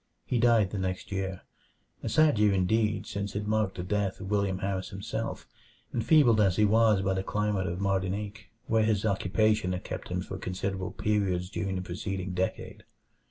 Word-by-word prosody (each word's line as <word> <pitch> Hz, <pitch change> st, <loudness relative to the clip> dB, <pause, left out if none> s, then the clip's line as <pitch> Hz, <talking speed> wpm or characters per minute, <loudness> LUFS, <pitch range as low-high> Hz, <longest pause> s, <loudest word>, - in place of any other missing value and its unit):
He 125 Hz, -, 0 dB
died 115 Hz, -4 st, +4 dB
the 100 Hz, -, -3 dB
next 95 Hz, +2 st, -3 dB
year 95 Hz, -1 st, -3 dB, 0.6 s
a -, -, -3 dB
sad 155 Hz, -7 st, +4 dB
year 105 Hz, -1 st, +4 dB
indeed, 105 Hz, +2 st, +1 dB
since 100 Hz, -1 st, -4 dB
it 105 Hz, 0 st, -2 dB
marked 105 Hz, -2 st, 0 dB
the 90 Hz, -, -4 dB
death 100 Hz, +1 st, -1 dB
of 95 Hz, +1 st, -6 dB
William 100 Hz, -2 st, +1 dB
Harris 95 Hz, -1 st, -2 dB
himself, 100 Hz, +1 st, -4 dB, 0.5 s
enfeebled 120 Hz, -3 st, +4 dB
as 95 Hz, -4 st, +3 dB
he 105 Hz, -, +4 dB
was 110 Hz, -2 st, +4 dB
by 95 Hz, 0 st, +1 dB
the 95 Hz, -, -1 dB
climate 105 Hz, -1 st, -1 dB
of 85 Hz, +2 st, -3 dB
Martinique, 100 Hz, +2 st, -2 dB, 0.2 s
where 110 Hz, 0 st, +2 dB
his 110 Hz, -1 st, +1 dB
occupation 105 Hz, 0 st, +1 dB
had 90 Hz, -, -4 dB
kept -, -, -6 dB
him -, -, -1 dB
for -, -, -6 dB
considerable 95 Hz, 0 st, -3 dB
periods 95 Hz, -3 st, -1 dB
during 95 Hz, 0 st, -2 dB
the 90 Hz, -, -3 dB
preceding 95 Hz, +1 st, -4 dB
decade. 90 Hz, +1 st, -3 dB
100 Hz, 180 wpm, -29 LUFS, 95-105 Hz, 0.6 s, died